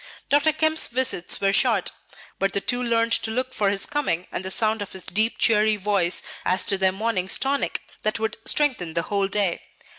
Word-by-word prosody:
Dr. 290 Hz, +2 st, +4 dB
Kemp's 315 Hz, +1 st, +2 dB
visits 235 Hz, -8 st, -1 dB
were 195 Hz, 0 st, +1 dB
short, 220 Hz, -4 st, +2 dB, 0.5 s
but 195 Hz, 0 st, 0 dB
the -, -, +2 dB
two 245 Hz, +4 st, -1 dB
learned 230 Hz, -1 st, +1 dB
to 225 Hz, -, 0 dB
look 255 Hz, +3 st, -2 dB
for 205 Hz, -5 st, +1 dB
his 195 Hz, 0 st, +1 dB
coming 275 Hz, -, -2 dB
and -, -, -3 dB
the 190 Hz, -, -4 dB
sound 220 Hz, +2 st, +1 dB
of 200 Hz, -, -6 dB
his 190 Hz, -3 st, -6 dB
deep, 215 Hz, +5 st, 0 dB
cheery 215 Hz, -1 st, +3 dB
voice, 190 Hz, -4 st, +1 dB, 0.2 s
as 185 Hz, -, +1 dB
to 200 Hz, -, +1 dB
their 190 Hz, 0 st, +3 dB
morning's 195 Hz, -2 st, 0 dB
tonic 275 Hz, +1 st, -1 dB, 0.2 s
that 215 Hz, -, 0 dB
would 220 Hz, -1 st, -3 dB
strengthen 250 Hz, -, +1 dB
the 170 Hz, -, 0 dB
whole 200 Hz, +2 st, -1 dB
day. 195 Hz, -3 st, 0 dB
210 Hz, 200 wpm, -23 LUFS, 190-245 Hz, 0.5 s, Dr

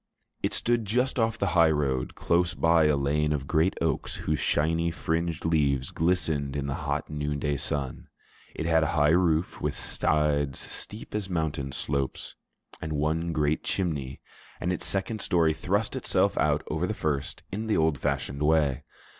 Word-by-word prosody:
It -, -, 0 dB
stood 120 Hz, -1 st, +1 dB
just 125 Hz, +5 st, +1 dB
off 115 Hz, 0 st, +1 dB
the 100 Hz, -3 st, 0 dB
high 85 Hz, -3 st, +6 dB
road, 70 Hz, -5 st, 0 dB
close 85 Hz, 0 st, +1 dB
by 80 Hz, -1 st, +4 dB
a 75 Hz, -1 st, +3 dB
lane 75 Hz, +2 st, +1 dB
of 70 Hz, -3 st, -1 dB
great 80 Hz, +5 st, +2 dB
oaks -, -, -1 dB
whose 75 Hz, -1 st, -1 dB
shiny, 80 Hz, +3 st, +1 dB
fringed 80 Hz, 0 st, -2 dB
leaves 70 Hz, -5 st, +1 dB
glistened 80 Hz, -5 st, 0 dB
in 70 Hz, -1 st, -2 dB
the 70 Hz, -, -2 dB
hot 75 Hz, 0 st, -3 dB
noon 75 Hz, -1 st, -2 dB
day 75 Hz, 0 st, -1 dB
sun; 70 Hz, -1 st, -3 dB, 0.5 s
it 80 Hz, -, -3 dB
had 80 Hz, -1 st, +4 dB
a 80 Hz, -, +2 dB
high 75 Hz, +1 st, +5 dB
roof 85 Hz, -1 st, +2 dB
with -, -, -1 dB
sides 75 Hz, -3 st, 0 dB
steep 105 Hz, +2 st, -7 dB
as 105 Hz, -2 st, -2 dB
mountain 80 Hz, -6 st, -2 dB
slopes, 70 Hz, +1 st, -3 dB, 0.5 s
and 80 Hz, -, -3 dB
one 80 Hz, +3 st, 0 dB
great 75 Hz, -1 st, 0 dB
chimney; 70 Hz, -8 st, -2 dB, 0.4 s
and 90 Hz, +2 st, 0 dB
its 90 Hz, -, -3 dB
second 100 Hz, +2 st, -1 dB
story 85 Hz, -5 st, +3 dB
thrust 95 Hz, +7 st, -1 dB
itself -, -, +1 dB
out -, -, +2 dB
over 80 Hz, +4 st, -1 dB
the 110 Hz, -, -2 dB
first 75 Hz, -5 st, -2 dB
in 110 Hz, +3 st, -3 dB
the 110 Hz, -, +2 dB
old 80 Hz, -3 st, +2 dB
fashioned 70 Hz, +2 st, -2 dB
way. 75 Hz, -4 st, +2 dB
80 Hz, 170 wpm, -27 LUFS, 75-85 Hz, 0.5 s, high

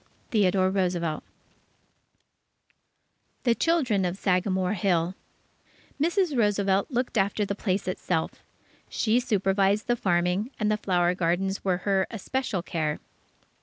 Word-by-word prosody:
Theodore 190 Hz, -3 st, +3 dB
Roosevelt 175 Hz, -5 st, -1 dB, 2.2 s
THE 240 Hz, -, +4 dB
CHILDREN 255 Hz, -, +1 dB
OF 180 Hz, +1 st, -2 dB
SAGAMORE 185 Hz, 0 st, +1 dB
HILL 175 Hz, -3 st, +1 dB, 0.9 s
Mrs. 345 Hz, -1 st, +1 dB
Roosevelt 200 Hz, -3 st, +2 dB
looked 245 Hz, -3 st, -1 dB
after 200 Hz, +2 st, +1 dB
the 200 Hz, -, -2 dB
place 195 Hz, -1 st, -2 dB
itself. 180 Hz, -3 st, -2 dB, 0.5 s
She 230 Hz, +2 st, +2 dB
supervised 200 Hz, -3 st, +1 dB
the 240 Hz, -, +1 dB
farming, 180 Hz, +1 st, 0 dB
and 215 Hz, -1 st, +1 dB
the 210 Hz, -, +1 dB
flower 180 Hz, -3 st, +1 dB
gardens 185 Hz, +3 st, -1 dB
were 185 Hz, -2 st, +1 dB
her 195 Hz, -2 st, +2 dB
especial 225 Hz, -3 st, -3 dB
care. 155 Hz, -4 st, -2 dB
195 Hz, 115 wpm, -26 LUFS, 180-215 Hz, 2.2 s, THE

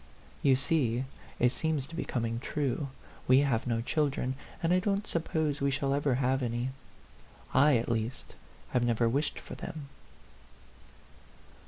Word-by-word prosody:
You 135 Hz, -2 st, +5 dB
see, 130 Hz, -3 st, +1 dB, 0.3 s
it 125 Hz, 0 st, +4 dB
seems 155 Hz, -1 st, -1 dB
to 165 Hz, -, -14 dB
be 170 Hz, -, -1 dB
coming 115 Hz, -2 st, -1 dB
true. 140 Hz, +1 st, -1 dB, 0.4 s
We 130 Hz, +2 st, +7 dB
have 130 Hz, -4 st, +1 dB
no 115 Hz, -1 st, +1 dB
children, 135 Hz, -1 st, 0 dB, 0.3 s
and 165 Hz, +2 st, +3 dB
I 185 Hz, -, +5 dB
don't 200 Hz, +2 st, 0 dB
suppose 160 Hz, -3 st, -1 dB
we 140 Hz, -, +3 dB
shall 135 Hz, 0 st, 0 dB
ever 140 Hz, -2 st, +2 dB
have 130 Hz, +1 st, +1 dB
any. 120 Hz, +1 st, -1 dB, 0.8 s
I, 140 Hz, 0 st, +6 dB
at 115 Hz, -, -2 dB
least, 115 Hz, +1 st, -2 dB, 0.4 s
have 125 Hz, -, +2 dB
never 120 Hz, -1 st, +2 dB
wished 140 Hz, +6 st, 0 dB
for -, -, -9 dB
them." 145 Hz, -3 st, -7 dB
135 Hz, 150 wpm, -30 LUFS, 120-150 Hz, 0.8 s, We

